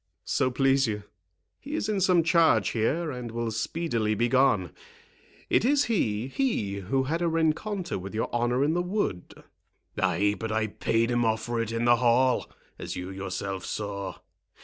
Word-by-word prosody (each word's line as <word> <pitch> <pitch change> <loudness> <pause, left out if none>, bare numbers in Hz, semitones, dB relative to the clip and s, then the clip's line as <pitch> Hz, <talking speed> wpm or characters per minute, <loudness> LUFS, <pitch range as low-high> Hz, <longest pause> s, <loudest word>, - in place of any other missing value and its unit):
"So 130 - +1
please 135 +1 +2
you, 105 -2 -3 0.6
he 290 +3 -6
is 210 - -1
in 210 -3 0
some 180 -2 +4
charge 165 - +4
here, 150 +9 0
and 125 -2 -6
will 115 0 -3
speedily 110 -2 -1
be 120 +3 +1
gone.—It 115 - -1
is 285 +3 +3
he—he 125 - -1
who 135 +1 +2
had 160 +6 -2
a 170 - +2
rencontre 165 - -1
with 95 +3 -8
your 110 - 0
honour 120 +2 +1
in 150 +2 +2
the 175 - +1
wood." 180 - -3 0.6
"Ay, 105 0 +2
but 110 -1 -3
I 110 0 +1
paid 115 +2 0
him 120 0 +2
off 110 -1 0
for 120 0 -1
it 115 -1 -3
in 115 +1 -1
the 120 0 +5
hall, 125 +1 +2 0.3
as - - -5
you 90 +1 -5
yourself 95 0 -4
saw. 100 -2 -4
120 Hz, 170 wpm, -27 LUFS, 110-165 Hz, 0.6 s, the